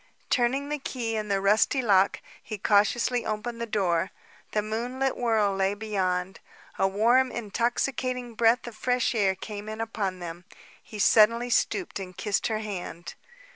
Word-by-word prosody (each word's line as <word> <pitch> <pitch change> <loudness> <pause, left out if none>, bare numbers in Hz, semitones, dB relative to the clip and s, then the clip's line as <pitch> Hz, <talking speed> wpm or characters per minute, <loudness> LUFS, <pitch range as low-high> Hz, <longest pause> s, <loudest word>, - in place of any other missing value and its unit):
Turning 265 +3 +1
the 295 0 -2
key 240 -4 -3
in 215 -1 -2
the 200 -1 +1
rusty 210 +7 +3
lock, 200 -5 +3 0.2
he 215 0 -6
cautiously 225 +5 +2
opened 230 +2 -4
the 235 - -2
door. 190 -4 +1 0.4
The 210 - 0
moonlit 245 +5 -2
world 215 -5 +1
lay 195 +1 +1
beyond. 190 -3 -2 0.4
A 195 - +4
warm, 240 +6 +3
intoxicating 240 +2 -2
breath 230 +2 +3
of 240 -2 -8
fresh 250 +2 0
air 200 -4 +2
came 205 +2 -7
in 220 0 -6
upon 210 -4 -2
them. 175 0 -8 0.4
He 215 - -10
suddenly 230 +4 +4
stooped 355 - 0
and 185 -2 -8
kissed 210 -2 0
her 215 -1 -2
hand. 180 -4 -6
215 Hz, 155 wpm, -27 LUFS, 195-240 Hz, 0.4 s, A